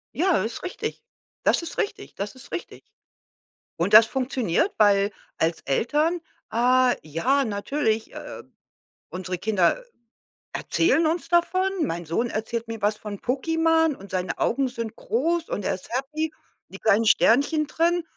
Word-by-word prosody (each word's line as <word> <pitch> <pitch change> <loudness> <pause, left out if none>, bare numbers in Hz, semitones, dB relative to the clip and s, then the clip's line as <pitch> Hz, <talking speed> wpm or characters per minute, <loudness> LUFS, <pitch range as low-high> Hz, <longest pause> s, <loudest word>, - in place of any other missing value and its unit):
Ja, 350 - +2
ist 225 +1 -5
richtig. 365 - -5 0.4
Das - - +3
ist 335 - -7
richtig, 410 0 -3
das 200 +4 -4
ist 260 - -13
richtig. - - -6 0.9
Und 175 +5 -1
das 220 +1 +10
funktioniert, 260 - 0
weil 205 -1 +4 0.3
als 165 +1 0
Eltern 300 - +1 0.3
ah 250 +2 +4
ja, 245 - +1
natürlich, 220 +1 -1
äh, - - -8 0.7
unsere 185 0 -4
Kinder 210 - +1 0.7
erzählen 330 0 +2
uns 330 +2 -1
davon. 370 +2 +2
Mein 170 0 -2
Sohn 230 +10 0
erzählt 230 +1 -3
mir 225 -2 -7
was 210 +1 +2
von 205 -2 -7
Pokémon 325 +4 +2
und 195 -3 -13
seine 185 -1 -2
Augen 270 +3 +1
sind 230 -3 -6
groß 330 +8 -1
und 205 - -3
er - - 0
ist 185 - -9
happy, 305 +4 -2 0.4
die - - -10
kleinen 220 +1 +3
Sternchen 285 +8 +4
drin 340 +1 +1
245 Hz, 145 wpm, -25 LUFS, 205-320 Hz, 0.9 s, das